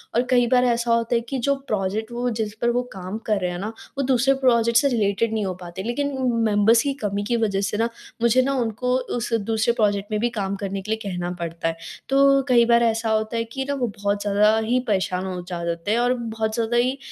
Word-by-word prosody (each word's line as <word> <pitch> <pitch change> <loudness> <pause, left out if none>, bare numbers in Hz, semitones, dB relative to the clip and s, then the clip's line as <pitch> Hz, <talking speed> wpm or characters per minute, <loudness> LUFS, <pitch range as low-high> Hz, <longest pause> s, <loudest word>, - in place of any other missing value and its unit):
और 240 - +3
कई 245 -2 +4
बार 250 -1 +5
ऐसा 235 -1 +1
होता 230 +1 +1
है 235 - +2
कि 270 - -2
जो 280 +3 +1
प्रोजेक्ट 215 +2 -2
वो 245 +1 -1
जिस 215 -1 -2
पर 235 - +2
वो 245 +1 +1
काम 190 +2 -6
कर 210 -2 +2
रहे 180 -1 -1
हैं 175 - -5
ना, 210 - -3 0.3
वो 275 - 0
दूसरे 260 +1 +3
प्रोजेक्ट 235 -2 +4
से 280 - +2
रिलेटेड 220 -1 0
नहीं 215 -2 -1
हो 185 - -2
पाते, 175 +2 -7
लेकिन 280 +5 -2 0.3
मेंबर्स 215 +2 +4
की 280 -1 0
कमी 205 0 -1
की 235 - +1
वजह 200 -3 0
से 210 - -3
ना, 230 +1 +1 0.3
मुझे 235 +2 +4
ना 275 +2 0
उनको 245 +3 -1 0.2
उस 235 0 -4
दूसरे 225 +1 +1
प्रोजेक्ट 205 -2 0
में 210 - 0
भी 240 - +2
काम 195 0 -2
करने 195 0 -3
के 215 - -6
लिए 220 - 0
कहना 180 -1 -3
पड़ता 165 0 -3
है। 165 0 -2 0.3
तो 275 0 +5
कई 235 -1 +5
बार 235 0 +4
ऐसा 225 0 +1
होता 220 +1 0
है 230 - 0
कि 265 0 -2
ना - - +1
वो 250 -3 -1
बहुत 205 0 0
ज़्यादा 210 +2 +3
ही 250 +2 +2
परेशान 190 -2 0
हो 185 -1 -4 0.3
जाते 170 +5 -4
हैं 225 - +2
और 245 +1 +2
बहुत 225 -3 -3
ज़्यादा 230 +1 0
ही 255 +3 +1
225 Hz, 240 wpm, -23 LUFS, 200-240 Hz, 0.3 s, बार